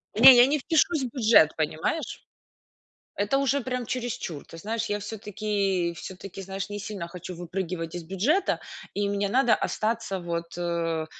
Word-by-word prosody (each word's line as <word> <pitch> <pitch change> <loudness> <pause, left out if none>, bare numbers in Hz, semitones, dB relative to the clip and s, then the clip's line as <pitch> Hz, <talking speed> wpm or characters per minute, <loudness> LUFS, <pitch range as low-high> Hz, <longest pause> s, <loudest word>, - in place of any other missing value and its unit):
Не, 255 +4 +10
я 245 +1 +8
не 300 +2 +2
впишусь 315 0 +2
в 250 - -2
бюджет, 220 - +5
понимаешь? 155 - -2 0.9
Это 205 +7 +1
уже, 275 0 +1
прям, 250 -1 -3
чересчур. 240 - -4
Ты 165 - -12
знаешь, 225 +4 -2
я 205 0 -1
всё-таки 200 -4 -1
всё-таки, 190 +1 -8
знаешь, 195 +1 -5
не 205 0 -4
сильно 200 -5 -5
хочу 180 +1 -8
выпрыгивать 175 -1 -4
из 175 - -4
бюджета, 205 - +1 0.3
и 205 0 -1
мне 200 0 0
надо 245 0 +4
остаться, 220 -3 -2
вот, 170 0 -5
э, 165 -2 -1
200 Hz, 155 wpm, -26 LUFS, 175-240 Hz, 0.9 s, Не